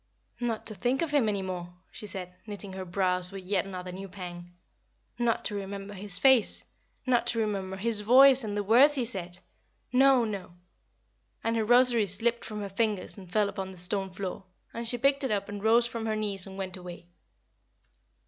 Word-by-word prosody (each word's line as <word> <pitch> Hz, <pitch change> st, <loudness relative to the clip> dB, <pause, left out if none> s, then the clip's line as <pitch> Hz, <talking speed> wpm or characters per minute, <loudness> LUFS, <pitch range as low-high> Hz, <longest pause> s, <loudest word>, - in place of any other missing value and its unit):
"Not 235 Hz, -3 st, -2 dB
to 215 Hz, -, -2 dB
think 250 Hz, +7 st, 0 dB
of 325 Hz, -, -2 dB
him 275 Hz, -7 st, +3 dB
any 200 Hz, -2 st, -1 dB
more," 175 Hz, -1 st, -6 dB, 0.2 s
she 210 Hz, -, -6 dB
said, 180 Hz, -3 st, -6 dB
knitting 205 Hz, -2 st, -7 dB
her 190 Hz, 0 st, -6 dB
brows 180 Hz, 0 st, 0 dB
with 195 Hz, -1 st, -8 dB
yet 185 Hz, -1 st, 0 dB
another 185 Hz, -2 st, -7 dB
new 190 Hz, +2 st, -8 dB
pang. 175 Hz, -2 st, -8 dB, 0.7 s
"Not 235 Hz, -1 st, 0 dB
to 210 Hz, -, 0 dB
remember 200 Hz, 0 st, -6 dB
his 195 Hz, -1 st, -1 dB
face 265 Hz, -5 st, +4 dB, 0.4 s
not 250 Hz, -2 st, +2 dB
to 230 Hz, -, +3 dB
remember 195 Hz, -3 st, -2 dB
his 215 Hz, +1 st, 0 dB
voice 260 Hz, +4 st, +7 dB
and 205 Hz, -1 st, -3 dB
the 205 Hz, -, 0 dB
words 255 Hz, +8 st, +6 dB
he 255 Hz, -3 st, 0 dB
said! 180 Hz, -6 st, -5 dB, 0.6 s
No, 265 Hz, -1 st, +5 dB
no!" 195 Hz, -5 st, -6 dB, 0.9 s
And 230 Hz, 0 st, 0 dB
her 225 Hz, -, +1 dB
rosary 240 Hz, -1 st, +5 dB
slipped 230 Hz, +5 st, 0 dB
from 215 Hz, -1 st, -5 dB
her 200 Hz, -, -5 dB
fingers 210 Hz, -1 st, -1 dB
and 185 Hz, -3 st, -13 dB
fell 210 Hz, +1 st, +2 dB
upon 195 Hz, -1 st, -5 dB
the 190 Hz, -, -11 dB
stone 190 Hz, +2 st, -1 dB
floor, 190 Hz, 0 st, -6 dB, 0.3 s
and 235 Hz, 0 st, -4 dB
she 245 Hz, -, +1 dB
picked 275 Hz, +3 st, +2 dB
it 265 Hz, -, 0 dB
up 200 Hz, -2 st, -1 dB
and 205 Hz, 0 st, -7 dB
rose 230 Hz, +2 st, +4 dB
from 230 Hz, -2 st, -4 dB
her 215 Hz, -, 0 dB
knees 205 Hz, -3 st, -1 dB
and 190 Hz, 0 st, -10 dB
went 190 Hz, -1 st, -5 dB
away. 180 Hz, -1 st, -10 dB
205 Hz, 195 wpm, -28 LUFS, 190-230 Hz, 0.9 s, voice